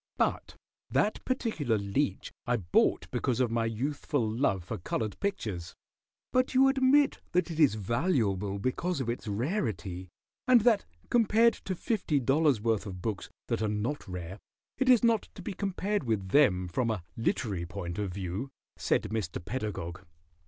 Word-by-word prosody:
But - - 0 0.3
that 210 - +1
particular 190 - 0
Leech 100 +8 -1 0.2
I 125 0 +2
bought 85 -6 +2
because 125 -2 0
of 125 -3 +2
my 115 0 +1
youthful 130 +1 -1
love 110 -5 0
for 90 - -5
colored 110 +4 -3
pictures." 105 - -3 0.6
"But 255 +1 +2
you 270 +1 +6
admit 270 +1 +4
that 180 -1 +1
it 160 - -5
is 145 -8 +5
valuable 105 - 0
because 140 - -1
of 125 -3 -2
its 120 -1 -4
rarity, 105 - -2 0.4
and 250 -2 +7
that 225 -1 +3 0.3
compared 230 0 +5
to 190 - -5
fifty 180 -7 0
dollars' 135 0 +3
worth 110 -1 0
of 90 -2 -6
books 110 -4 -3 0.2
that - - -1
are 110 - +1
not 105 +6 -2
rare 90 +1 -6 0.4
it 265 -1 +2
is 245 -3 +6
not 230 -2 +2
to 185 - -9
be 205 - -4
compared 200 0 -1
with 105 -5 -1
them 95 -9 +4
from 115 +7 -1
a 105 -6 -2
literary 105 -6 -1
point 90 -1 -5
of 100 -3 -2
view?" 95 +7 -4 0.3
said - - +1
Mr. 110 -6 -3
Pedagog. 100 -8 -4
120 Hz, 160 wpm, -30 LUFS, -, 0.6 s, and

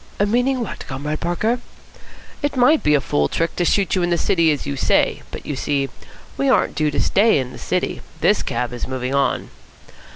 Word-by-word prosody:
"Meaning 245 +4 +1
what, 230 - -5
Comrade 150 +3 -4
Parker?" 215 +8 0 0.8
"It 290 -1 -1
might 255 +5 +5
be 150 - +3
a - - +4
fool 75 - +1
trick 165 - -2
to 175 - +2
shoot 190 -3 +2
you 185 - +2
in 175 - +1
the 170 - +2
city 165 -2 +3
as 145 - -2
you 140 0 -3
say, 130 - +2
but, - - -9
you 145 - -3
see, 140 0 -1 0.5
we 275 - +1
aren't - - +3
due 155 -1 +1
to 145 - -2
stay 215 0 +3
in 130 -2 -2
the - - -10
city. - - -2 0.2
This - - +3
cab 120 +1 -2
is 120 - -4
moving 130 0 -3
on." 140 -1 0
155 Hz, 205 wpm, -21 LUFS, 135-215 Hz, 0.8 s, might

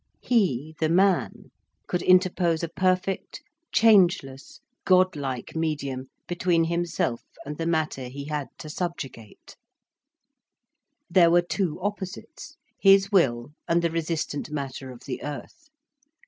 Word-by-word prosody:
He, 160 - +1
the 160 - +1
man, 190 +3 +1 0.3
could 180 - -2
interpose 180 -2 +3
a 165 - -2
perfect, 185 +2 -1 0.3
changeless, 175 -11 +3 0.2
godlike 155 -10 +1
medium 140 -5 -2 0.2
between 175 -1 +1
himself 170 -7 -1 0.2
and 150 +1 -5
the 165 - -1
Matter 155 -6 -1
he 140 +3 -7
had 150 -2 -3
to - - -9
subjugate. 150 - -6 1.5
There 170 -1 +5
were 175 +1 +4
two 175 -2 -2
opposites, 200 -1 -6 0.2
his 195 0 +5
will 130 - +2 0.2
and 170 +1 +2
the 170 - +1
resistant 160 -2 -3
Matter 140 -2 -5
of 125 -2 -11
the 130 - -6
earth. 310 - -8
165 Hz, 120 wpm, -25 LUFS, 140-185 Hz, 1.5 s, There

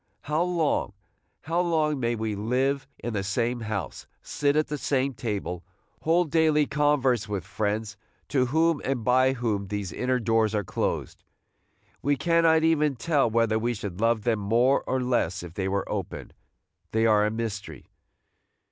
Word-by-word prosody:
How 150 +2 -1
long, 170 - 0 0.5
how 165 +4 0
long 155 -5 +1
we 120 0 0
may 110 -1 -2
live 130 +6 0
in 120 - -5
the 100 - -1
same 115 +5 -1
house, 110 -5 -5 0.2
sit 145 0 0
at 155 0 +3
the 150 - -4
same 135 0 0
table, 100 -6 -4 0.4
hold 165 -1 +2
daily 155 -2 +3
converse 140 -6 +1
with 100 -4 -3
friends 105 +2 -2 0.3
to 130 -3 +2
whom 160 +3 +2
and 130 -3 -1
by 130 +2 +4
whom 110 -6 -2
these 100 -3 -4
inner 125 +5 0
doors 115 -2 +1
are 105 - 0
closed! - - -3 0.8
We 145 +1 +2
cannot 165 +1 +3
even 150 -3 +2
tell 140 0 +1
whether 110 -1 +2
we 120 +2 -1
should 100 -2 -6
love 115 -2 +2
them 115 -2 +1
more 120 +7 +2
or 130 - 0
less 95 -8 0
if 85 -2 -9
they 95 0 -2
were 100 0 -1
open, - - -5 0.3
– - - -49
they 110 0 +2
are 105 -2 +4
a - - +1
mystery. 110 -2 -5
120 Hz, 165 wpm, -26 LUFS, 105-145 Hz, 0.8 s, by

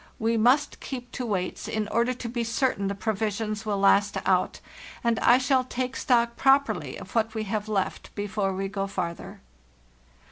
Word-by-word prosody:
We 230 +1 +1
must 255 +7 +3
keep 245 -2 -7
to 250 -2 -4
weights 185 -4 -2
in 215 -1 -2
order 235 +2 +1
to 240 - -6
be 235 0 -2
certain 230 -3 0
the 200 - -2
pro 220 +3 -1
visions 215 +1 -3
will 205 -1 0
last 200 +1 +4
out, - - +1 0.4
and 235 -1 +2
I 240 - +6
shall 260 0 +2
take 255 0 -3
stock 235 -3 +2
properly 275 +2 +2
of - - -11
what 225 0 0
we 220 - -1
have 210 +1 -3
left 195 -3 -2
before 205 -1 -1
we 195 +1 -2
go 195 0 -3
farther. 170 -3 -5
220 Hz, 180 wpm, -26 LUFS, 200-245 Hz, 0.4 s, I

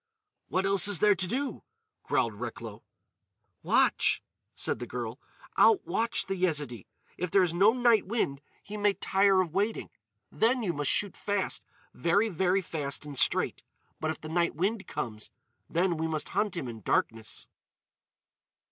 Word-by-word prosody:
"What 185 +1 0
else 195 -1 +4
is 205 -3 +2
there 210 +5 +5
to 185 -1 -2
do?" 270 +7 -2 0.4
growled - - 0
Recklow. - - -7 0.8
"Watch," - - +2 0.3
said - - -1
the - - -5
girl. - - -5 0.4
"Out 425 -4 +5
watch 230 +1 0
the 195 - -2
Yezidee. 150 - -1 0.3
If 180 - -1
there 195 +2 +4
is 170 -2 0
no 195 +5 +5
night 240 -5 +3
wind 165 -11 -1 0.2
he 210 +1 -7
may 205 -1 +3
tire 195 -1 +3
of 170 -4 -4
waiting. 205 +4 -1 0.4
Then 240 +2 +2
you 180 -5 0
must 145 -2 -1
shoot 205 -2 0
fast—very, 205 0 -1
very 190 +1 +1
fast 150 -4 -4
and 145 -1 -7
straight. - - +2 0.4
But 155 - -1
if 160 - -3
the 155 - -8
night 170 0 +1
wind 195 +5 -1
comes, 110 -2 -5 0.4
then 175 0 +1
we 160 +1 -1
must 155 -2 -3
hunt 205 -1 0
him 135 - -3
in 115 -2 -8
darkness." 110 +3 -1
185 Hz, 155 wpm, -29 LUFS, 160-205 Hz, 0.8 s, there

